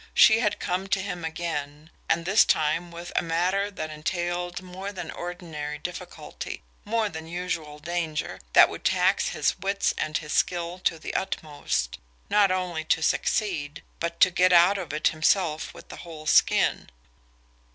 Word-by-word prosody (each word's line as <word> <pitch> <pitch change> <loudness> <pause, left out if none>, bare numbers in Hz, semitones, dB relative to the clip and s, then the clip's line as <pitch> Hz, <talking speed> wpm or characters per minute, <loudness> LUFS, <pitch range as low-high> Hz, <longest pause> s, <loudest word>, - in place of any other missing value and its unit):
She 220 0 +7
had 210 -4 +1
come 185 +2 -2
to 195 - +1
him 180 -3 -4
again 160 -2 -4 0.2
and 165 0 +1
this 195 +5 +6
time 155 +3 +1
with 170 +1 -8
a - - +3
matter 180 +5 0
that 155 -6 -6
entailed 175 +3 -3
more 185 +2 -6
than 190 - -6
ordinary 165 -4 -6
difficulty, 175 +4 -7 0.2
more 225 0 0
than 160 -4 -7
usual 170 -3 -4
danger, 160 -1 -3
that - - +9
would - - -8
tax - - +2
his - - 0
wits 195 +2 0
and 155 0 0
his 150 -2 -5
skill 175 0 0
to 165 - +2
the 160 - -6
utmost, 150 - -2 0.3
not 205 -2 +5
only 180 -3 -1
to 160 0 +1
succeed, 155 -11 0 0.2
but 170 0 -3
to 185 - +7
get 185 0 +4
out 180 +3 +6
of 175 -6 -5
it 155 +1 +2
himself 160 0 +1
with - - -12
a - - -9
whole 160 -3 -10
skin. - - +3
175 Hz, 160 wpm, -26 LUFS, 155-185 Hz, 0.3 s, that